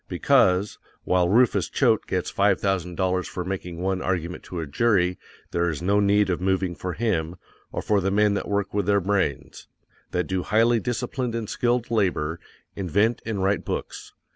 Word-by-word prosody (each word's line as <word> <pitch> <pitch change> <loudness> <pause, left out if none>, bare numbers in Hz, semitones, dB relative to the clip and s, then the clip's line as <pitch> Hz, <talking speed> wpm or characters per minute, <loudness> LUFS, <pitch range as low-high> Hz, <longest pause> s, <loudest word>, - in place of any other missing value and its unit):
BECAUSE, 100 -1 +2 0.2
WHILE 90 -1 +2
RUFUS 120 +4 +3
CHOATE 115 -5 +2
GETS 90 -2 -2
FIVE 100 -1 +2
THOUSAND 90 -3 -1
DOLLARS 95 -1 0
FOR 90 - -5
MAKING 90 -2 -5
ONE 95 0 -1
ARGUMENT 90 -2 -2
TO 90 - -6
A 80 - -3
JURY, 90 +3 +1 0.3
there 85 0 +1
is 80 +1 -4
no 100 +3 +3
need 100 -1 +3
of 90 - -2
moving 95 -1 0
for 90 +1 -5
him, 90 -7 -1 0.4
or - - -4
for 105 -2 +2
the 95 - 0
men 105 +1 +3
that 100 - -3
work 100 -1 -1
with 100 -2 -1
their 100 0 +4
brains_, 95 -7 -2 0.4
that 90 - 0
do 95 -1 -1
highly 115 +4 +3
disciplined 120 +1 -3
and 115 -2 -3
skilled 120 +1 0
labor, 85 -7 0 0.4
invent, 100 +5 +1
and 100 -4 -2
write 100 +1 +1
books. - - -5
95 Hz, 180 wpm, -24 LUFS, 90-105 Hz, 0.4 s, their